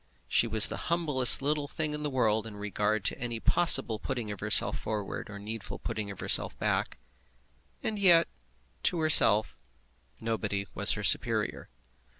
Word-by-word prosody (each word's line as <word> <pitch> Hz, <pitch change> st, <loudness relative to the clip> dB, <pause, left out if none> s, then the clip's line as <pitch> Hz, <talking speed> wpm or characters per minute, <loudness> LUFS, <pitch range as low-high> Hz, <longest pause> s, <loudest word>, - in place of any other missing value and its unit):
She 115 Hz, -, 0 dB
was 110 Hz, -1 st, +7 dB
the -, -, -7 dB
humblest 150 Hz, -7 st, +4 dB
little 145 Hz, 0 st, -3 dB
thing 150 Hz, +1 st, -5 dB
in 150 Hz, -, -6 dB
the 150 Hz, -, -4 dB
world 110 Hz, -5 st, -2 dB
in 105 Hz, -2 st, -12 dB
regard 105 Hz, +1 st, -4 dB
to -, -, -2 dB
any 120 Hz, -2 st, -6 dB
possible 135 Hz, -8 st, +3 dB
putting 120 Hz, -5 st, -6 dB
of 100 Hz, -, -9 dB
herself -, -, +2 dB
forward 105 Hz, -2 st, -7 dB
or 105 Hz, -, -10 dB
needful 105 Hz, 0 st, -8 dB
putting 105 Hz, -2 st, -7 dB
of 100 Hz, -2 st, -10 dB
herself -, -, +1 dB
back; -, -, -3 dB, 0.9 s
and 215 Hz, -1 st, -4 dB
yet, 175 Hz, -4 st, +3 dB, 0.5 s
to 175 Hz, -, -1 dB
herself, 110 Hz, -9 st, +4 dB, 0.6 s
nobody 105 Hz, -3 st, -5 dB
was -, -, +2 dB
her -, -, -6 dB
superior. -, -, 0 dB
115 Hz, 155 wpm, -27 LUFS, 105-150 Hz, 0.9 s, was